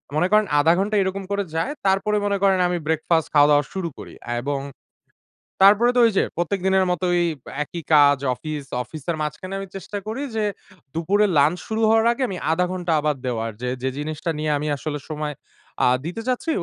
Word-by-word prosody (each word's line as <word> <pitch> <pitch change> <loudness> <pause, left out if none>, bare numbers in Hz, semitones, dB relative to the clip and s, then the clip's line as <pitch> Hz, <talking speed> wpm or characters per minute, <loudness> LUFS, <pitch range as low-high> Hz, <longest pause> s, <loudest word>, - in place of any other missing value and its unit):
মনে 175 +4 +2
করেন 215 0 +5
০.৫ 165 +3 +5
ঘন্টা 210 +2 0
এরকম 190 +1 -3
করে 200 0 0
যায়। 210 - 0 0.2
তারপরে 200 +2 +2
মনে 200 -1 +1
করেন 190 -1 +4
আমি 175 0 -1
ব্রেকফাস্ট 160 0 +1
খাওয়া-দাওয়া 145 0 +5
শুরু 185 -3 -3
করি। - - -10 0.3
এবং 140 +1 -2 1.0
তারপরে 210 +5 +6
তো - - +4
ঐযে 200 -4 +2
প্রত্যেক 175 +3 -1
দিনের 190 0 +3
মতই, 175 0 +1 0.4
একই 170 +3 -7
কাজ 145 -1 +6 0.2
অফিস, 150 +3 -6 0.2
অফিসের 160 +3 -5
মাঝখানে 150 +6 -4
আমি 195 - -6
চেষ্টা 200 +2 -6
করি 230 +6 -3
যে, 215 - 0 0.5
দুপুরে 195 +6 +2
লাঞ্চ 155 +5 +4
শুরু 220 0 -2
হওয়ার 225 0 +4
আগে 260 +2 -2
আমি 185 - -4
০.৫ 180 +2 +2
ঘন্টা 180 -2 -2
আবার 150 -1 0
দেওয়ার। 115 -2 -2
যে, 125 - -2
যে 130 - 0
জিনিসটা 155 +3 -4
নিয়ে 155 0 0
আমি 150 +1 -3
আসলে 150 0 -4
সময় 150 -1 -3 0.5
আ - - +5 0.2
দিতে 180 +7 -4
চাচ্ছি 255 +6 -1
175 Hz, 185 wpm, -22 LUFS, 150-195 Hz, 1.0 s, তারপরে